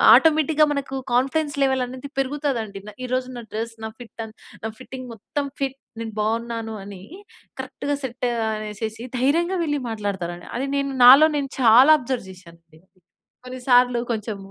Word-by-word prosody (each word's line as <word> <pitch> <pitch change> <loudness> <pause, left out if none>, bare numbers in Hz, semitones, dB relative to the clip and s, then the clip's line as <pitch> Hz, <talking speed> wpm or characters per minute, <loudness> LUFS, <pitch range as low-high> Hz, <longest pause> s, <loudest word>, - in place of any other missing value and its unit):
ఆటోమేటిక్‌గా 310 -1 +4
మనకు 275 -1 -4 0.2
confidence 285 +3 +1
level 265 -1 +1
అనేది 260 +2 -8
పెరుగుతదండి. 265 -7 -2
న - - -6
ఈ - - -3
రోజు 255 0 -1
నా - - -6
డ్రెస్ 225 +1 -3
నా - - -2
ఫిట్ 235 -1 -13
అన్ 220 0 -11 0.3
నా 220 - -1
ఫిట్టింగ్ 255 -1 -8
మొత్తం 280 +7 -4
ఫిట్ 270 -1 -2 0.2
నేను 225 -1 -5
బావున్నాను 225 +1 -2
అని 195 -2 -10 0.6
కరెక్ట్‌గా 290 0 -3
సెట్ 255 0 -4 0.3
అనేసేసి 215 +2 -5
ధైర్యంగా 335 +8 +2
వెళ్ళి 295 -2 0
మాట్లాడతారండి. 190 -5 -4
అది 265 +3 -1
నేను 275 0 0
నాలో 270 +5 +10
నేను 275 -2 -1
చాలా 250 +5 +7
అబ్జర్వ్ 250 -5 -3
చేశానండి. 170 -3 -17 0.7
కొన్నిసార్లు 250 -1 +3
కొంచెం 215 -2 -3
250 Hz, 150 wpm, -23 LUFS, 220-275 Hz, 0.7 s, నాలో